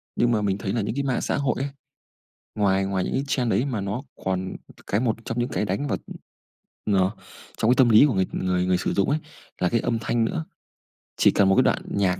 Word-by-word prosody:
Nhưng 120 Hz, 0 st, +2 dB
mà 110 Hz, -, +2 dB
mình 100 Hz, -1 st, 0 dB
thấy 95 Hz, 0 st, -3 dB
là 115 Hz, -, 0 dB
những 110 Hz, +4 st, -3 dB
cái 140 Hz, -, -1 dB
mạng 130 Hz, -3 st, 0 dB
xã -, -, -1 dB
hội 140 Hz, -2 st, 0 dB
ấy, 140 Hz, -, -2 dB, 0.9 s
ngoài 95 Hz, -2 st, +2 dB
ngoài 95 Hz, -1 st, -1 dB
những -, -, -3 dB
cái 135 Hz, -, 0 dB
trang 125 Hz, -3 st, 0 dB
đấy 120 Hz, -, +2 dB
mà 125 Hz, -7 st, -2 dB
nó 100 Hz, +6 st, -3 dB, 0.2 s
còn 95 Hz, 0 st, -2 dB, 0.3 s
cái 100 Hz, -, +1 dB
một 115 Hz, -3 st, +1 dB
trong 115 Hz, -, -4 dB
những 120 Hz, +1 st, 0 dB
cái -, -, -1 dB
đánh 100 Hz, +9 st, -2 dB
vào, -, -, -1 dB, 0.9 s
ờ, 95 Hz, -2 st, +3 dB, 0.5 s
trong 110 Hz, -, +2 dB
cái -, -, +6 dB
tâm 130 Hz, -3 st, +5 dB
lý 115 Hz, +6 st, +7 dB
của 135 Hz, -, 0 dB
người 95 Hz, -1 st, +2 dB
người 90 Hz, -1 st, 0 dB
người 90 Hz, -1 st, +3 dB
sử -, -, -1 dB
dụng 100 Hz, +7 st, +1 dB
ấy, 150 Hz, -, +2 dB, 0.4 s
là 90 Hz, -, +3 dB
cái 115 Hz, -, +1 dB
âm 115 Hz, 0 st, -1 dB
thanh 115 Hz, +1 st, 0 dB
nữa. 160 Hz, +8 st, -2 dB, 0.7 s
Chỉ -, -, +5 dB
cần 95 Hz, -1 st, +3 dB
1 95 Hz, -, +4 dB
cái -, -, +5 dB
đoạn -, -, +1 dB
nhạc, 95 Hz, -2 st, 0 dB
105 Hz, 245 wpm, -24 LUFS, 95-120 Hz, 0.9 s, lý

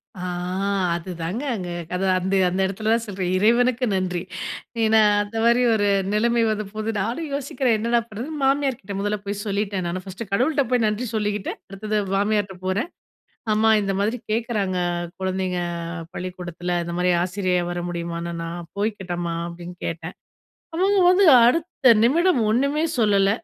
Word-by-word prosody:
ஆ. -, -, -10 dB, 0.8 s
அதுதாங்க. 175 Hz, +4 st, -5 dB
அங்க 180 Hz, -4 st, -5 dB, 0.3 s
அந்த 190 Hz, +2 st, -1 dB, 0.4 s
அந்த 185 Hz, +2 st, -2 dB
இடத்துல 215 Hz, +3 st, -1 dB
தான் 230 Hz, -, +1 dB
சொல்றேன் 185 Hz, -3 st, -2 dB
இறைவனுக்கு 245 Hz, +4 st, +3 dB
நன்றி. 180 Hz, -2 st, -1 dB, 0.6 s
ஏன்னா, 220 Hz, 0 st, +5 dB, 0.2 s
அந்த 205 Hz, +2 st, -7 dB
மாரி 235 Hz, +1 st, +4 dB
ஒரு 205 Hz, -1 st, +1 dB, 0.3 s
நிலைமை 235 Hz, +2 st, +2 dB
வந்து 215 Hz, 0 st, -2 dB
போகுது. 215 Hz, +1 st, -2 dB
நானும் 250 Hz, +10 st, -3 dB
யோசிக்கிறேன் 265 Hz, -3 st, 0 dB
என்னடா 235 Hz, +2 st, +2 dB
பண்றதுன்னு 260 Hz, +8 st, -6 dB
மாமியார்கிட்ட 270 Hz, -7 st, 0 dB
முதல்ல 205 Hz, +1 st, -1 dB
போய் 205 Hz, +1 st, -3 dB
சொல்லிட்டேன் 200 Hz, -2 st, -1 dB
நானு, 185 Hz, +2 st, -4 dB
ஃபர்ஸ்ட்டு 195 Hz, +3 st, -8 dB
கடவுள்கிட்ட 275 Hz, +7 st, +2 dB
போய் 245 Hz, -2 st, +3 dB
நன்றி 215 Hz, +4 st, -2 dB
சொல்லிக்கிட்டு. 210 Hz, -2 st, -1 dB, 0.2 s
அடுத்தது 210 Hz, +2 st, -3 dB, 0.2 s
மாமியார்ட்ட 205 Hz, -1 st, 0 dB
போறேன். 200 Hz, -, -1 dB, 0.6 s
அம்மா 220 Hz, +1 st, +3 dB
இந்த 195 Hz, -1 st, -1 dB
மாதிரி 215 Hz, +5 st, 0 dB
கேட்கறாங்க, 215 Hz, -5 st, -1 dB, 0.4 s
குழந்தைங்க 185 Hz, -1 st, -1 dB, 0.5 s
பள்ளிக்கூடத்துல 180 Hz, -1 st, -4 dB
இந்த 170 Hz, 0 st, -5 dB
மாதிரி 180 Hz, 0 st, +2 dB
ஆசிரியையா 180 Hz, -1 st, 0 dB
வர 175 Hz, -, -3 dB
முடியுமானு, 170 Hz, 0 st, -4 dB
நான் 170 Hz, 0 st, -6 dB
போய்க்கிட்டமா? 180 Hz, -5 st, -2 dB
அப்டின்னு 175 Hz, +1 st, -9 dB
கேட்டன். 165 Hz, +2 st, -5 dB, 0.6 s
அவங்க 390 Hz, +4 st, +2 dB
வந்து 380 Hz, +2 st, +5 dB, 0.2 s
அடுத்த 310 Hz, 0 st, +2 dB
நிமிடம் 330 Hz, +6 st, +4 dB
ஒன்னுமே 280 Hz, +7 st, +1 dB, 0.2 s
சொல்லல. 200 Hz, -3 st, +4 dB
205 Hz, 140 wpm, -23 LUFS, 185-235 Hz, 0.8 s, ஏன்னா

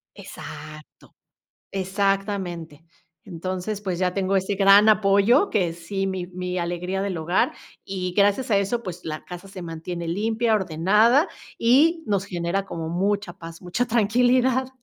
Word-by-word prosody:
Exacto. 155 Hz, 0 st, -11 dB, 0.6 s
Exactamente. 190 Hz, -4 st, -2 dB, 0.4 s
Entonces, 185 Hz, +3 st, -4 dB
pues, 185 Hz, -4 st, -3 dB
ya 180 Hz, -1 st, +1 dB
tengo 195 Hz, 0 st, 0 dB
ese 190 Hz, +2 st, 0 dB
gran 200 Hz, +2 st, +6 dB
apoyo 215 Hz, -, +4 dB
que 180 Hz, -6 st, +1 dB
sí. 195 Hz, +4 st, -3 dB
Mi 190 Hz, -2 st, -3 dB
mi 180 Hz, 0 st, -5 dB
alegría 175 Hz, +2 st, -2 dB
del 195 Hz, -2 st, -2 dB
hogar. 165 Hz, +4 st, +1 dB, 0.3 s
Y 185 Hz, -2 st, -4 dB
gracias 205 Hz, +5 st, +2 dB
a 205 Hz, -, +4 dB
eso, 200 Hz, +4 st, -1 dB
pues 180 Hz, -4 st, -7 dB
la 155 Hz, -1 st, -5 dB
casa 180 Hz, +1 st, -9 dB
se 190 Hz, -1 st, -9 dB
mantiene 170 Hz, +1 st, -6 dB
limpia, 220 Hz, +5 st, 0 dB
ordenada 210 Hz, -, +3 dB, 0.3 s
y 305 Hz, +8 st, +4 dB
nos 200 Hz, -2 st, 0 dB
genera 180 Hz, 0 st, -2 dB
como 165 Hz, -4 st, -5 dB
mucha 195 Hz, +2 st, -1 dB
paz, 165 Hz, -2 st, -10 dB
mucha 180 Hz, +7 st, -1 dB
tranquilidad. 245 Hz, +3 st, +2 dB
195 Hz, 140 wpm, -24 LUFS, 175-210 Hz, 0.6 s, gran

